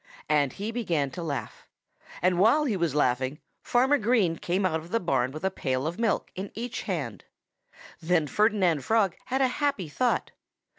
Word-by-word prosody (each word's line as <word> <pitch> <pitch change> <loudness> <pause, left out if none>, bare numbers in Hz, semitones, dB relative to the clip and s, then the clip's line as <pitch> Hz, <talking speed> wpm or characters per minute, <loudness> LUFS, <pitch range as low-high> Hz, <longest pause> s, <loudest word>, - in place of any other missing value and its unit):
And 145 -3 +2
he 210 +3 -4
began 170 - -1
to 175 - -6
laugh. 150 -4 -5 0.6
And 180 -1 +3
while 235 +10 +5
he 235 -7 0
was 170 -6 0
laughing, 130 0 +1 0.2
Farmer 265 +4 +3
Green 215 -7 +2
came 180 +4 -1
out 160 -3 +1
of 165 +2 -12
the 230 +4 +1
barn 135 - +1
with 155 +4 -8
a 190 - +1
pail 130 -6 -2
of 170 +6 -3
milk 230 -2 0
in 190 +2 -6
each 235 +2 -4
hand. - - -4 0.8
Then 165 -1 +2
Ferdinand 185 -4 +2
Frog 220 -5 +2
had 265 +1 0
a - - +5
happy 250 - 0
thought. 245 +11 0
180 Hz, 180 wpm, -27 LUFS, 155-225 Hz, 0.8 s, while